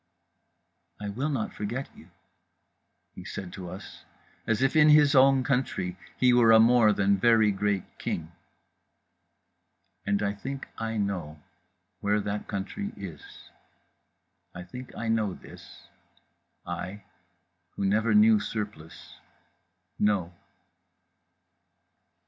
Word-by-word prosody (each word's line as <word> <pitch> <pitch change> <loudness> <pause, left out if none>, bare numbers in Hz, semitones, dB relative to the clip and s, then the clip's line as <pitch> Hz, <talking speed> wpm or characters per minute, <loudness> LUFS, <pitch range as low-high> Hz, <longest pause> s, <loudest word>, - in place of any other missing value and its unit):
"I 105 0 -5
will 130 +9 -2
not 130 -7 -2
forget 120 +6 -4
you," 80 - -16 1.0
he - - -10
said 90 -2 -7
to 90 -3 -7
us, 95 +3 -10 0.4
as 115 +3 +1
if 135 +3 +1
in 155 -1 +6
his 150 -1 +6
own 135 -1 +5
country 125 -9 -1 0.2
he 125 -1 +4
were 120 -2 +5
a 110 - +8
more 115 -1 +5
than 100 -1 +2
very 110 -1 +4
great 100 -1 -1 0.2
king… 80 0 -4 1.7
and 100 0 0
I 100 0 0
think 135 +7 -7
I 115 0 -3
know 90 -7 -3 0.6
where 105 +1 +1
that 105 0 -4
country 105 - -5
is, 95 -5 -8 1.3
I 90 - -7
think 125 +6 -10
I 115 - -4
know 110 -4 0
this; - - -14 0.8
I, 100 +2 -6 0.7
who 100 - -2
never 105 +2 +2
knew 110 +1 +6
Surplice, 100 -7 -7 0.8
know. 100 -5 +1
105 Hz, 115 wpm, -27 LUFS, 100-120 Hz, 1.7 s, a